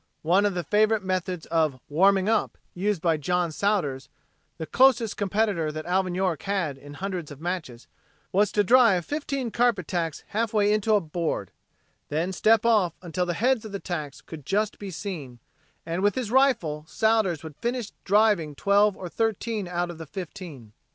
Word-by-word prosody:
One 185 +6 +4
of 200 - -3
the 175 - -2
favorite 215 +1 +2
methods 185 -2 -2
of 155 -5 0
"warming 190 +5 +3
up" 225 -1 +1 0.2
used 195 -1 -1
by 165 -2 +2
John 175 +2 0
Sowders, 155 -8 -1 0.5
the 160 - -4
closest 240 0 +3
competitor 200 -5 0
that 155 0 -6
Alvin 185 0 0
York 185 -5 0
had 190 -8 -1
in 145 +2 -12
hundreds 185 -3 -4
of 145 -2 -10
matches, 160 -8 -5 0.5
was 205 +1 +2
to 205 - +3
drive 220 -6 +5
fifteen 275 -5 -3
carpet 235 -8 +1
tacks 165 -4 -2
halfway 210 -1 +1
into 215 +1 +2
a - - +4
board, 160 - -3 0.6
then 165 +5 -1
step 220 +4 +3
off 210 -8 +3
until 180 +1 -2
the 175 - -1
heads 250 +2 +2
of 215 -2 -9
the 200 - -3
tacks 155 -7 -5
could 155 -3 -10
just 210 +7 -1
be 200 - -6
seen, 160 -9 -6 0.5
and 170 +2 -2
with 205 0 +2
his 245 -5 -3
rifle 230 - +2
Sowders 215 -3 +1
would 160 -2 -9
finish 240 +2 -3
driving 200 -7 +2
twelve 200 +4 +3
or 185 - -6
thirteen 225 0 -2
out 175 0 -2
of 165 - -11
the 160 - -8
fifteen. 165 - -8
185 Hz, 175 wpm, -26 LUFS, 165-210 Hz, 0.6 s, drive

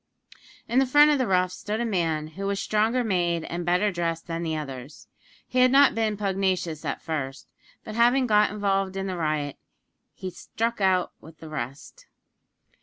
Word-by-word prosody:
In 240 +3 +2
the 270 - +3
front 295 +3 +6
of 290 - +2
the 255 - +1
roughs 185 -1 +2
stood 210 +2 -4
a 240 - 0
man 165 -7 -1
who 195 +5 -5
was 200 0 -1
stronger 220 +5 +1
made 175 -6 0
and 175 +2 -4
better 180 +4 +2
dressed 165 -2 -2
than 165 -1 -4
the 160 -2 -2
others. 135 -1 -8 0.4
He 255 - -1
had 255 0 +6
not 275 +1 +6
been 220 -2 0
pugnacious 190 -5 -1
at - - -4
first; 145 -4 -5 0.3
but 215 - -7
having 240 +3 +4
got 210 -2 +4
involved 195 -2 -1
in 195 - -2
the 190 -1 -3
riot, 155 -4 -2 0.6
he 185 - -6
struck 230 +5 -3
out 185 -2 +2
with 160 +1 -14
the 160 - -11
rest. 150 - -7
190 Hz, 180 wpm, -26 LUFS, 165-220 Hz, 0.6 s, front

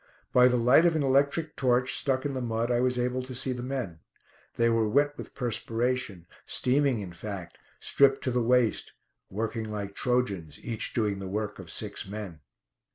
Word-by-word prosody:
By 125 0 +7
the 125 0 +2
light 125 +8 +5
of 165 - +1
an 155 - +1
electric 140 +4 +2
torch, 125 -1 +2
stuck 135 0 +1
in 145 - -1
the 130 - -3
mud, 115 0 -1
I 120 - +2
was 125 0 +1
able 125 +1 0
to 130 0 -8
see 130 +2 -1
the 125 - -5
men. 125 -10 -4 0.6
They 115 - +3
were 115 -2 +2
wet 145 +4 +2
with - - -10
perspiration, 120 -5 -2 0.2
steaming, 135 0 +2
in 90 -3 -7
fact; 90 -2 -7 0.2
stripped 135 -1 +3
to 130 - 0
the 125 0 +1
waist; 120 -1 +2 0.4
working 110 +2 -3
like 100 -2 -4
Trojans, 100 - -1
each 115 -3 -3
doing 105 -4 0
the 95 - -5
work 105 +1 -3
of 90 -3 -9
six 105 +3 -3
men. 100 -5 -7
120 Hz, 185 wpm, -28 LUFS, 105-130 Hz, 0.6 s, By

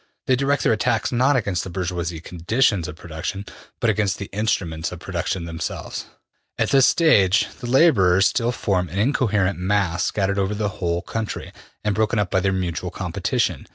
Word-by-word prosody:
They 130 - +3
direct 140 +2 +1
their - - +4
attacks 115 +2 0
not 130 +3 +3
against 100 -7 0
the - - -6
bourgeois 85 -2 -3
conditions 90 +1 +1
of 75 - -7
production, 85 +5 -6 0.3
but 115 - +3
against 100 -2 0
the 100 - -7
instruments 90 -6 -1
of 90 - -7
production 85 0 -3
themselves.'' 85 -1 -5 0.5
``At - - 0
this 135 -2 +6
stage 105 - +4
the 120 - -6
laborers 100 - +5
still 120 +1 +1
form 95 -7 -1
an 90 - -6
incoherent 105 - +1
mass 95 -2 0
scattered 100 -1 0
over 100 +2 0
the 105 -1 -1
whole 85 -1 -1
country, 110 -1 -4 0.3
and 105 -1 +1
broken 110 +1 +1
up 105 -3 0
by 95 - +3
their 95 +1 +1
mutual 90 -3 -2
competition. - - -2
100 Hz, 175 wpm, -22 LUFS, 90-110 Hz, 0.5 s, this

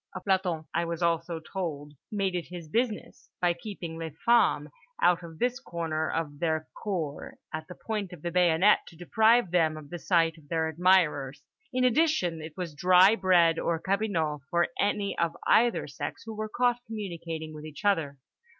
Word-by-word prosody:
A - - -3
planton, 185 -4 0
I 170 - +1
was 170 0 -3
also 165 0 0
told, 155 -4 -5 0.2
made 195 -3 0
it 175 -2 -3
his 175 -3 -8
business, 230 +4 -2
by 175 -1 +2
keeping 170 -3 -7
les 160 -3 -6
femmes 230 -11 +4 0.3
out 175 0 +4
of 165 -2 -10
this 250 +4 0
corner 165 -8 -3
of 150 -3 -3
their 160 -2 -1 0.2
cour 170 -9 -4 0.2
at 155 0 -5
the 180 - -9
point 210 -3 -4
of 175 -4 -11
the 175 - -2
bayonet 180 +3 +4
to 170 - -13
deprive 220 +3 +3
them 160 -3 +2
of 145 -2 -11
the 175 - -5
sight 165 -2 +2
of 145 -2 -22
their 160 -1 0
admirers. 160 -5 +2 0.3
In 255 -1 0
addition, 250 - +2
it 155 0 -9
was 175 -4 -4
dry 185 +6 +6
bread 175 -5 +4
or 170 - 0
cabinot 185 -6 -1
for 170 0 +2
any 205 0 0
of 170 0 0
either 240 +1 +3
sex - - -6
who 225 - -6
were 215 0 -4
caught 245 +1 +1
communicating 170 -7 -5
with 150 0 -9
each 155 +4 -9
other. 160 -9 +1
170 Hz, 180 wpm, -28 LUFS, 160-200 Hz, 0.3 s, dry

